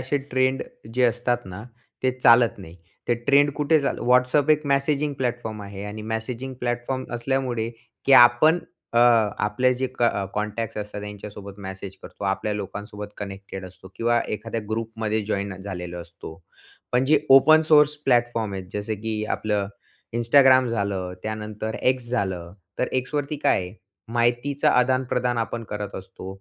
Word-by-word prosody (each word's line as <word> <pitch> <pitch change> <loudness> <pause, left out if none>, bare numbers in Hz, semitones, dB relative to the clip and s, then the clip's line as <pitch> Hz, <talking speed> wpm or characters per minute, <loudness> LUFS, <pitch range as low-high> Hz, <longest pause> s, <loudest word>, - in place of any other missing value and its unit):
असे 130 +3 -1 0.2
ट्रेंड 130 +1 +2 0.3
जे 125 - +2
असतात 120 0 0
ना, 95 +2 -8 0.4
ते 130 - +3
चालत 120 -1 +5
नाही. 85 -3 -11 0.3
ते 120 - +4
ट्रेंड 145 +1 +5
कुठे 150 +2 +3
चाल 140 - -1
WhatsApp 125 +4 +4
एक 150 0 +3
मेसेजिंग 140 +1 +1
प्लॅटफॉर्म 120 -4 -3
आहे 100 0 -8
आणि 105 +1 -6
मेसेजिंग 125 +4 -4
प्लॅटफॉर्म 120 +2 -2
असल्यामुळे 120 -2 -1 0.4
की 140 - +5 0.2
आपण 155 +8 +3 0.4
अ, - - +4 0.5
आपले 125 +5 +2
जे 130 +1 -1
अ, - - -9
क 115 -4 +2
कॉन्टॅक्ट्स 105 +2 -3
असतात 105 0 -5
त्यांच्यासोबत 105 -1 -9
मेसेज 95 0 -7
करतो. - - -9
आपल्या 100 +2 -1
लोकांसोबत 105 +1 -7
कनेक्टेड 100 -1 -7
असतो 95 +1 -14
किंवा 120 0 +2
एखाद्या 115 +2 -4
ग्रुपमध्ये 110 -1 -2
जॉइन 100 -2 -2
झालेलो 90 -3 -6
असतो. 85 -1 -10 0.6
पण 125 +1 +3
जे 150 +2 +4 0.2
ओपन 155 +4 +7
सोर्स 150 -1 +5
प्लॅटफॉर्म 120 -4 +1
आहेत, 95 -1 -5
जसं 105 +1 -2
की 110 -1 -2
आपलं 105 -2 -1 0.5
Instagram 130 +2 +5
झालं, 100 -5 -2
त्यानंतर 110 0 -4 0.2
X 125 -2 -10
झालं. 95 -8 -2 0.3
तर 125 - 0
X 130 +3 -3
वरती 145 +1 -1
काय - - +4
आहे? 90 0 -7 0.4
माहितीचं 120 +4 +1
आदानप्रदान 125 -1 +1
आपण 115 +1 -3
करत 105 -1 -5
असतो. 95 0 -10
115 Hz, 150 wpm, -24 LUFS, 105-130 Hz, 0.6 s, ओपन